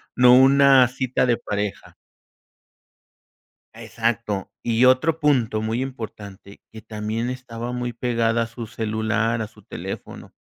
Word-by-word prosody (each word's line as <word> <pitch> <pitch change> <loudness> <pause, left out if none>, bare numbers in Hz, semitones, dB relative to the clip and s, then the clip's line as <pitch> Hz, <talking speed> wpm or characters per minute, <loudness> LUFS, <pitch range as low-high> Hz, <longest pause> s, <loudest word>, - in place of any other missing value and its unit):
no 125 0 +6
una 135 0 +6
cita 130 0 -1
de 120 -2 +2
pareja. 105 -1 -5 1.8
Exacto. 115 -4 -3
Y 115 +1 +2
otro 130 +6 +3
punto 125 -8 +1
muy 110 +3 -2
importante, 105 -6 -9
que 110 - -11
también 110 +2 -4
estaba 125 -2 -6
muy 125 0 -3
pegada 115 -1 0
a - - -2
su 115 -1 -8
celular, 110 +1 -1
a 110 - -6
su 110 -1 -20
teléfono, 95 +1 -8
115 Hz, 125 wpm, -22 LUFS, 110-125 Hz, 1.8 s, no